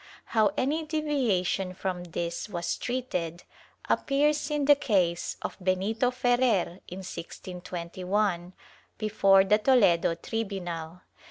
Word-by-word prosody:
^ - - -21 0.2
How 215 -3 +2
any 300 +5 0
deviation 245 - 0
from 180 -1 -3
this 170 +3 -4
was 170 -3 -2
treated, 180 -10 -3 0.4
appears 290 +1 +1
in 295 -1 0
the 290 - +8
case 185 -11 0
of - - -4
Benito 195 +6 +1
Ferrer, 245 -7 +1
in 190 +1 -7
1621, 180 +1 -3 0.4
before 195 -3 +4
the 210 +2 +3
Toledo 200 -9 +4
tribunal. 180 -4 -4
195 Hz, 110 wpm, -28 LUFS, 175-245 Hz, 0.4 s, the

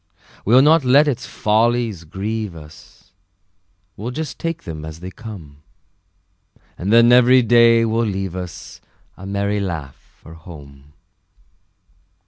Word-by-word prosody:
We'll 125 +5 +5
not 155 +1 +4
let 140 +4 +4
its 135 -2 -3
follies 110 -4 0
grieve 100 +3 -5
us, 80 +4 -16 0.8
We'll 110 +5 -6
just 155 +4 -6
take 165 0 -4
them 80 -3 -8
as 80 +1 -9
they 90 +2 -8
come; 85 -11 -11 1.1
And 95 +4 -4
then 115 +1 +6
every 125 +1 +5
day 115 0 +4
will 115 +1 0
leave 95 -3 -4
us 90 -2 -9 0.3
A 95 - -11
merry 100 +1 -2
laugh 80 -9 -7
for 80 - -14
home. 75 -4 -14
100 Hz, 125 wpm, -19 LUFS, 85-120 Hz, 1.1 s, then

